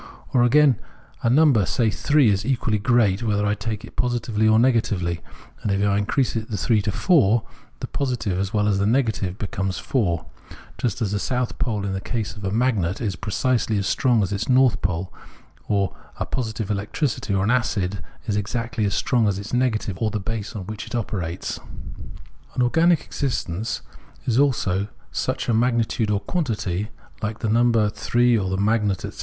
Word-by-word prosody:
Or, 125 Hz, -, +4 dB
again, 135 Hz, 0 st, +5 dB, 0.4 s
a 115 Hz, -, +2 dB
number, 135 Hz, -5 st, +5 dB
say 115 Hz, -4 st, +1 dB
three, 145 Hz, +1 st, +3 dB
is 100 Hz, +1 st, 0 dB
equally 115 Hz, -4 st, 0 dB
great, 110 Hz, -3 st, +3 dB
whether 105 Hz, -3 st, +1 dB
I 105 Hz, -, +2 dB
take 105 Hz, +2 st, -4 dB
it -, -, -15 dB
positively 115 Hz, -3 st, 0 dB
or 110 Hz, 0 st, +5 dB
negatively; 105 Hz, -8 st, +1 dB, 0.4 s
and 105 Hz, -, -1 dB
if 100 Hz, +1 st, +1 dB
I 100 Hz, -, +2 dB
increase 125 Hz, +5 st, 0 dB
the 110 Hz, -2 st, -3 dB
three 110 Hz, -1 st, +2 dB
to 105 Hz, -, -1 dB
four, 120 Hz, -, +3 dB, 0.4 s
the -, -, -2 dB
positive 125 Hz, -9 st, -2 dB
as 95 Hz, 0 st, -1 dB
well 105 Hz, -2 st, +1 dB
as 100 Hz, -2 st, +2 dB
the 100 Hz, -, +2 dB
negative 110 Hz, -6 st, 0 dB
becomes 95 Hz, -2 st, -3 dB
four: 95 Hz, -, 0 dB, 0.5 s
just 115 Hz, -1 st, -1 dB
as 100 Hz, -, -1 dB
the 105 Hz, -, 0 dB
south 125 Hz, +2 st, -2 dB
pole 105 Hz, -4 st, -1 dB
in 95 Hz, -, -2 dB
the 95 Hz, -, -3 dB
case 115 Hz, -1 st, -3 dB
of 100 Hz, -, -10 dB
a 95 Hz, -, 0 dB
magnet 105 Hz, -5 st, +1 dB
is 105 Hz, -6 st, -2 dB
precisely 110 Hz, +3 st, 0 dB
as 100 Hz, -, -1 dB
strong 120 Hz, +1 st, +2 dB
as 95 Hz, +1 st, -2 dB
its 100 Hz, +5 st, -3 dB
north 130 Hz, -2 st, +4 dB
pole, 90 Hz, 0 st, -2 dB, 0.5 s
or 100 Hz, -5 st, 0 dB, 0.2 s
a -, -, -2 dB
positive 110 Hz, -4 st, -3 dB
electricity 105 Hz, +2 st, -1 dB
or 95 Hz, -, +1 dB
an 110 Hz, -, +2 dB
acid, 100 Hz, -7 st, 0 dB, 0.2 s
is 105 Hz, -, -1 dB
exactly 110 Hz, +2 st, -2 dB
as 100 Hz, -, 0 dB
strong 120 Hz, -4 st, +2 dB
as 100 Hz, -2 st, 0 dB
its 100 Hz, +4 st, -7 dB
negative, 110 Hz, -6 st, 0 dB
or 110 Hz, -, +2 dB
the 105 Hz, -, -2 dB
base 110 Hz, +2 st, -4 dB
on 100 Hz, -3 st, -5 dB
which 105 Hz, +1 st, -6 dB
it -, -, -5 dB
operates. 95 Hz, -7 st, -3 dB, 1.0 s
An 125 Hz, -, +2 dB
organic 165 Hz, +6 st, +4 dB
existence 115 Hz, -, -3 dB, 0.4 s
is 120 Hz, 0 st, +2 dB
also 100 Hz, -9 st, +1 dB, 0.2 s
such -, -, -2 dB
a 120 Hz, -, +2 dB
magnitude 115 Hz, -1 st, +1 dB
or 105 Hz, -1 st, +1 dB
quantity, 110 Hz, -, -2 dB, 0.3 s
like 110 Hz, 0 st, -2 dB
the 115 Hz, -, -2 dB
number 115 Hz, -1 st, +3 dB
three 120 Hz, +2 st, +2 dB
or 95 Hz, -4 st, 0 dB
a 95 Hz, -, 0 dB
magnet, 105 Hz, -1 st, +1 dB
etc. -, -, -9 dB
110 Hz, 185 wpm, -23 LUFS, 100-120 Hz, 1.0 s, again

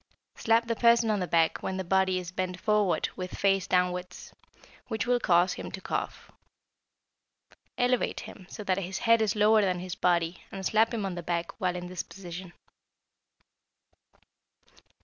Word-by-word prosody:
Slap 230 Hz, +1 st, +2 dB
the 230 Hz, 0 st, -1 dB
person 235 Hz, -1 st, +4 dB
on 210 Hz, -, 0 dB
the 180 Hz, -, -2 dB
back 165 Hz, -1 st, +2 dB
when 190 Hz, -, -3 dB
the 190 Hz, -, -2 dB
body 190 Hz, +1 st, +2 dB
is 180 Hz, -1 st, -5 dB
bent 185 Hz, 0 st, -3 dB
forward 210 Hz, -4 st, +1 dB
with 185 Hz, 0 st, -6 dB
face 195 Hz, -2 st, +2 dB
downwards, 180 Hz, 0 st, -1 dB, 0.5 s
which 220 Hz, -2 st, -2 dB
will 245 Hz, 0 st, +2 dB
cause 175 Hz, -3 st, +3 dB
him -, -, -7 dB
to -, -, -5 dB
cough. -, -, -4 dB, 1.5 s
Elevate 250 Hz, 0 st, +1 dB
him 185 Hz, -4 st, -11 dB
so 215 Hz, -, -7 dB
that 190 Hz, -1 st, 0 dB
his 190 Hz, 0 st, -4 dB
head 230 Hz, 0 st, +3 dB
is 215 Hz, -1 st, +1 dB
lower 215 Hz, +1 st, +5 dB
than 185 Hz, -3 st, +1 dB
his 180 Hz, 0 st, -5 dB
body 170 Hz, -1 st, 0 dB
and 190 Hz, -1 st, -6 dB
slap 220 Hz, +3 st, +3 dB
him 220 Hz, -4 st, -2 dB
on 190 Hz, -, -3 dB
the 175 Hz, -, -5 dB
back 170 Hz, 0 st, -2 dB
while 180 Hz, -1 st, 0 dB
in 180 Hz, 0 st, -5 dB
this 180 Hz, 0 st, -4 dB
position. 180 Hz, -1 st, -9 dB
190 Hz, 170 wpm, -28 LUFS, 180-215 Hz, 1.5 s, lower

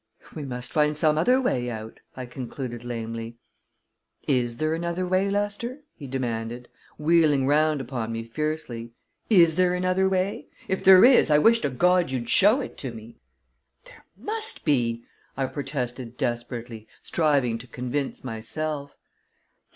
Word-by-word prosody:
"We 150 Hz, -3 st, -6 dB
must 125 Hz, -2 st, -5 dB
find 150 Hz, -1 st, +2 dB
some 155 Hz, 0 st, +3 dB
other 250 Hz, +12 st, +3 dB
way 125 Hz, -, 0 dB
out," 110 Hz, -1 st, -7 dB, 0.2 s
I 130 Hz, -, -5 dB
concluded 125 Hz, -1 st, -6 dB
lamely. 115 Hz, -1 st, -5 dB, 0.9 s
"Is 120 Hz, -4 st, +1 dB
there 155 Hz, +3 st, 0 dB
another 170 Hz, +2 st, -2 dB
way, 185 Hz, +2 st, +1 dB
Lester?" 205 Hz, +7 st, -2 dB
he 145 Hz, -, -10 dB
demanded, 120 Hz, -2 st, -4 dB, 0.3 s
wheeling 150 Hz, -3 st, +3 dB
round 150 Hz, +1 st, +2 dB
upon 120 Hz, -3 st, -4 dB
me 115 Hz, 0 st, -4 dB
fiercely. 120 Hz, -3 st, -4 dB, 0.4 s
"Is 170 Hz, -6 st, +5 dB
there 180 Hz, -1 st, +3 dB
another 185 Hz, +1 st, +1 dB
way? 185 Hz, -4 st, -1 dB, 0.2 s
If 190 Hz, -, -2 dB
there 190 Hz, +2 st, +9 dB
is, 250 Hz, -8 st, +6 dB
I 150 Hz, -, +5 dB
wish 230 Hz, +9 st, +5 dB
to 145 Hz, -, -1 dB
God 180 Hz, +6 st, +2 dB
you'd 125 Hz, -3 st, -3 dB
show 215 Hz, +8 st, +5 dB
it -, -, -8 dB
to 130 Hz, -, -4 dB
me!" 115 Hz, 0 st, -12 dB, 0.7 s
"There -, -, -17 dB
must 440 Hz, -, -3 dB
be!" 120 Hz, -6 st, +1 dB, 0.3 s
I 135 Hz, -, 0 dB
protested 130 Hz, -3 st, -5 dB
desperately, 120 Hz, -2 st, -4 dB, 0.2 s
striving 140 Hz, -8 st, +1 dB
to 125 Hz, -, -12 dB
convince 125 Hz, +3 st, -4 dB
myself. 140 Hz, +5 st, -4 dB
140 Hz, 145 wpm, -25 LUFS, 120-175 Hz, 0.9 s, there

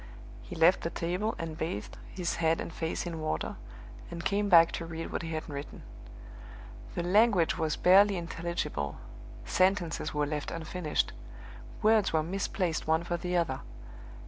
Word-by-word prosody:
He -, -, -9 dB
left 170 Hz, +3 st, +5 dB
the 165 Hz, -, -2 dB
table, 180 Hz, +7 st, -2 dB
and 165 Hz, -1 st, -5 dB
bathed 160 Hz, -10 st, -4 dB
his 180 Hz, -2 st, -3 dB
head 165 Hz, -1 st, +2 dB
and 165 Hz, -, -5 dB
face 165 Hz, +2 st, -3 dB
in 170 Hz, -2 st, -4 dB
water, 115 Hz, -, -2 dB, 0.5 s
and 170 Hz, 0 st, -7 dB
came 205 Hz, 0 st, +1 dB
back 165 Hz, -3 st, +7 dB
to 165 Hz, -, -4 dB
read 165 Hz, 0 st, -5 dB
what -, -, -2 dB
he 165 Hz, -, -5 dB
had 155 Hz, -1 st, -4 dB
written. 140 Hz, -1 st, -7 dB, 1.1 s
The 175 Hz, -, -1 dB
language 195 Hz, -1 st, +4 dB
was 155 Hz, -2 st, 0 dB
barely 195 Hz, +2 st, +6 dB
intelligible; 170 Hz, -, -3 dB, 0.5 s
sentences 185 Hz, -4 st, +1 dB
were 150 Hz, 0 st, 0 dB
left 150 Hz, 0 st, -3 dB
unfinished; 165 Hz, 0 st, -2 dB, 0.7 s
words 215 Hz, -1 st, +4 dB
were 160 Hz, -1 st, +2 dB
misplaced 180 Hz, -2 st, -2 dB
one 160 Hz, +1 st, +2 dB
for 175 Hz, 0 st, -2 dB
the 180 Hz, +1 st, -1 dB
other. 160 Hz, -6 st, 0 dB
170 Hz, 155 wpm, -30 LUFS, 160-180 Hz, 1.1 s, back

